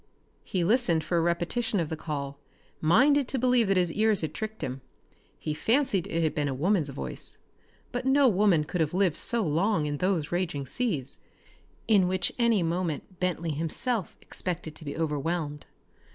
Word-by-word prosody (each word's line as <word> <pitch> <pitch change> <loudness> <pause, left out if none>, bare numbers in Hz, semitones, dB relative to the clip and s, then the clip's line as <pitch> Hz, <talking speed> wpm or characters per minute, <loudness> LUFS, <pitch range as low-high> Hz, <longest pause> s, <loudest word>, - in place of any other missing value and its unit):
He 180 -3 -1
listened 175 -5 +3
for 170 - 0
a - - +2
repetition 175 +6 0
of 165 -3 -1
the 160 - -2
call, 140 -3 -5 0.4
minded 265 - +4
to 270 - -1
believe 250 -3 +3
that 195 -1 +2
his 175 -2 +2
ears 215 -2 +2
had 160 - -3
tricked 220 0 -5
him. 130 +1 -4 0.6
He 155 - -3
fancied 215 - +1
it 165 0 -1
had 155 - +1
been 145 -1 0
a 135 - -2
woman's 165 +1 +1
voice, 140 - -6 0.5
but 245 0 -2
no 275 0 +5
woman 195 -7 +4
could 165 +3 -2
have 155 +2 0
lived 185 -5 +2
so 235 -2 +1
long 165 +2 +1
in 145 0 -2
those 180 -3 0
raging 175 -6 -1
seas, 150 - -2 0.7
in 200 -5 +5
which 185 0 0
any 230 -6 +3
moment 170 +1 -3
Bentley 170 -2 -1
himself 165 - -2
expected 175 -3 -3
to 155 - -12
be 145 - -5
overwhelmed. 150 -1 -2
175 Hz, 175 wpm, -28 LUFS, 155-215 Hz, 0.7 s, no